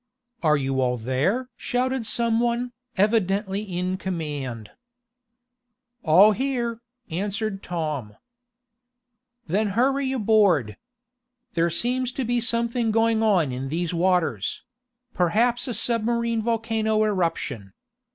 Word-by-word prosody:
"Are 155 -3 +3
you 135 -1 -1
all 125 -1 +1
there?" 150 - -1
shouted 250 -1 -1
some 230 0 +1
one, 240 +1 0 0.3
evidently 200 -1 +1
in 185 -2 -3
command. 145 - -5 1.3
"All 185 +5 +6
here," 235 0 -2 0.3
answered 200 +3 -2
Tom. 150 -11 -4 1.3
"Then 205 +6 0
hurry 270 +2 +2
aboard. 205 - +3 0.8
There 170 -2 +2
seems 250 +7 0
to 265 - -2
be 240 +1 0
something 235 0 0
going 225 0 +2
on 185 -10 +3
in 130 +2 -4
these 170 +3 -2
waters 170 - 0 0.5
perhaps 230 - +1
a 245 - -2
submarine 235 0 0
volcano 220 -1 0
eruption. 165 - -1
210 Hz, 105 wpm, -24 LUFS, 165-235 Hz, 1.3 s, All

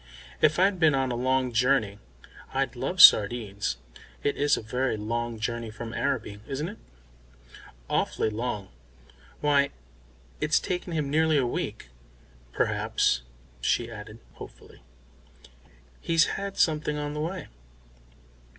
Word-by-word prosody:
"If 155 0 +4
I'd 190 +1 +3
been 160 -4 +4
on 135 -1 0
a - - -2
long 130 +1 +1
journey, 115 -4 +2 0.6
I'd - - 0
love - - -3
sardines. 100 - +6 0.5
It 145 - +1
is 145 +1 +2
a - - -6
very 125 +1 -1
long 115 +2 -3
journey 115 0 -3
from 115 +1 -7
Araby, 105 -5 -2
isn't 150 +5 -3
it?" 210 - -11 1.1
"Awful - - 0
long. 105 -4 -4 0.7
Why, 140 -1 +3 0.7
it's - - +2
taken 180 0 -4
him 150 -3 -1
nearly 160 0 +3
a 135 - +2
week. 120 - -4 0.6
Perhaps," - - +1 0.4
she 115 - 0
added 110 0 -9 0.2
hopefully, - - -13 1.2
"he's 165 -1 +3
had 200 0 -5
something 150 -2 +1
on 145 0 -3
the 150 - -3
way." 175 +2 -4
130 Hz, 125 wpm, -27 LUFS, 110-150 Hz, 1.2 s, sardines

